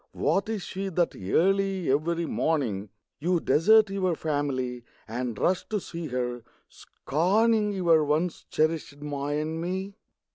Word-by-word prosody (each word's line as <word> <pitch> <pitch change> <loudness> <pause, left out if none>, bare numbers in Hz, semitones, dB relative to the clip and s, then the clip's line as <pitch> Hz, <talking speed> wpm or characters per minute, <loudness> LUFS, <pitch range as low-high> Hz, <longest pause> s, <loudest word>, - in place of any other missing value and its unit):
What 190 +8 0
is 215 -4 -2
she 195 +4 -4
That 175 -1 0
early 190 - +1
every 165 +4 0
morning 120 -13 -1 0.3
You 175 +3 +1
desert 215 +7 +4
your 185 -3 0
family 135 -6 -2 0.2
And 120 0 -3
rush 185 - 0
to 215 -2 0
see 170 -3 -6
her, 125 -2 -3 0.3
scorning 210 +7 +1
Your 170 -5 +3
once 155 +4 0
cherished 155 -2 0
ma 145 -1 -4
and 155 +2 -2
me? 190 +3 -3
165 Hz, 135 wpm, -27 LUFS, 145-190 Hz, 0.3 s, desert